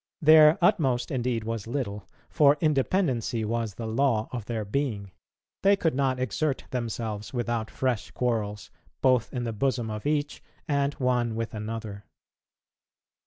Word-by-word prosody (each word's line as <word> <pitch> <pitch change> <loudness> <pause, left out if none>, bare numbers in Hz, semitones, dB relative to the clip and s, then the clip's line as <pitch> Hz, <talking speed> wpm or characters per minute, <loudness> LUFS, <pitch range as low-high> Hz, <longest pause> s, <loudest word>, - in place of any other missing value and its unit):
Their 155 0 +7
utmost 130 -8 +2
indeed 125 -4 -1
was 115 -1 -4
little, 105 -7 -4 0.2
for 150 -2 +4
independency 135 - +1
was 115 -2 -2
the 115 - -5
law 110 -1 +1
of 120 -5 -5
their 110 -2 -3
being; 105 -4 -2 0.5
they 200 +1 +5
could 165 -5 0
not 130 -1 0
exert 135 +2 -1
themselves 115 -4 -4
without 120 -2 -2
fresh 125 -5 -2
quarrels, 110 -4 -2 0.3
both 130 -3 +3
in 125 -2 -3
the 115 -1 -3
bosom 120 -1 -1
of 105 +5 -4
each, 150 -1 -1 0.3
and 140 -2 0
one 125 -4 0
with 115 0 -3
another. 105 -2 -6
120 Hz, 140 wpm, -27 LUFS, 110-140 Hz, 0.5 s, Their